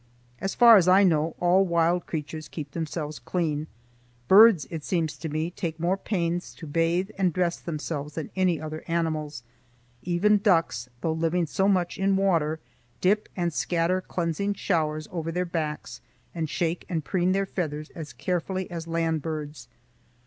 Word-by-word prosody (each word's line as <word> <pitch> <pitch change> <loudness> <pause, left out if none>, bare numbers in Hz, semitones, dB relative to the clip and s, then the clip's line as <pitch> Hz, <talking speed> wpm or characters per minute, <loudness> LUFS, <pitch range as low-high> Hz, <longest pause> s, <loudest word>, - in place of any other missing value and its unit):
As 195 - -3
far 235 -2 +9
as 180 -2 +3
I 190 +2 +6
know, 160 -3 +2
all 180 +2 +4
wild 170 -1 +1
creatures 155 0 -5
keep 150 -2 -7
themselves 155 -2 -4
clean. 155 -4 -2 0.6
Birds, 205 - +7
it 160 -3 -5
seems 160 -3 -1
to 160 - -4
me, 155 +3 -2
take 165 -2 -4
more 175 +3 +1
pains 175 -3 -2
to 165 - -9
bathe 165 +5 0
and 185 -2 +3
dress 175 0 0
themselves 150 -2 -5
than 160 - -5
any 185 -4 +2
other 155 0 -6
animals. 155 -5 -2 0.6
Even 195 +4 +3
ducks, 165 - +1
though 160 - 0
living 165 +2 0
so 190 +5 0
much 180 -3 +1
in 195 0 +2
water, 165 -5 +1 0.4
dip 210 +3 +2
and 175 -3 -1
scatter 175 +3 0
cleansing 185 +3 -2
showers 155 -5 -1
over 165 -2 -3
their 180 +2 -1
backs, 155 -3 -4 0.3
and 160 -3 -3
shake 170 +2 -1
and 160 -5 -2
preen 185 -1 +1
their 195 +1 +1
feathers 155 -5 -4
as 160 -3 -8
carefully 185 +1 -3
as 165 -1 -5
land 165 -1 0
birds. 150 -3 -5
170 Hz, 165 wpm, -26 LUFS, 155-185 Hz, 0.6 s, far